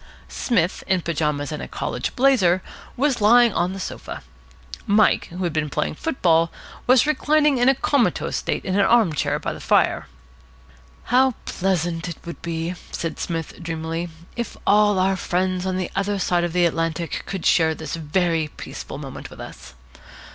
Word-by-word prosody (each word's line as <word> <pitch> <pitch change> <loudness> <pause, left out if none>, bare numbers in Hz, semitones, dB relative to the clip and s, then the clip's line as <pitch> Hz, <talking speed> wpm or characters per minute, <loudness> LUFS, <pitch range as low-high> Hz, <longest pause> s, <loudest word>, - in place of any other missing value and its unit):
Psmith, 185 -8 0
in 190 -2 +2
pyjamas 150 -3 -1
and 150 - -4
a - - -6
college - - -4
blazer, 220 -10 +3 0.3
was 265 -3 +1
lying 235 +2 +6
on 175 +2 0
the 195 - -6
sofa. - - -6 0.6
Mike, 210 +1 +4
who 180 +2 -6
had 170 -3 -1
been 155 -1 -1
playing - - -1
football, 165 - +1 0.4
was 255 +1 +6
reclining 300 -2 +2
in 245 +2 +5
a 270 - +4
comatose 275 -1 +1
state - - -2
in 185 - -1
an 200 - +3
arm 220 -5 +4
chair - - 0
by - - -4
the - - -9
fire. - - +2 1.0
"How 255 0 +3
pleasant 175 -2 -1
it 170 - -6
would 170 - -8
be," 165 +1 -3 0.2
said 165 -2 -4
Psmith 165 0 -4
dreamily, 165 +1 -3 0.3
"if 235 -2 -4
all 205 -1 +4
our 190 +1 +2
friends 185 0 -1
on 185 0 -1
the 185 -2 -3
other 200 +1 0
side 175 -2 +1
of 175 - -1
the 180 -1 +3
Atlantic 165 0 -1
could 190 -3 -4
share 160 -2 +4
this 155 -1 -5
very 165 0 0
peaceful - - -8
moment - - -8
with - - -13
us! 60 0 -10
180 Hz, 170 wpm, -22 LUFS, 165-210 Hz, 1.0 s, lying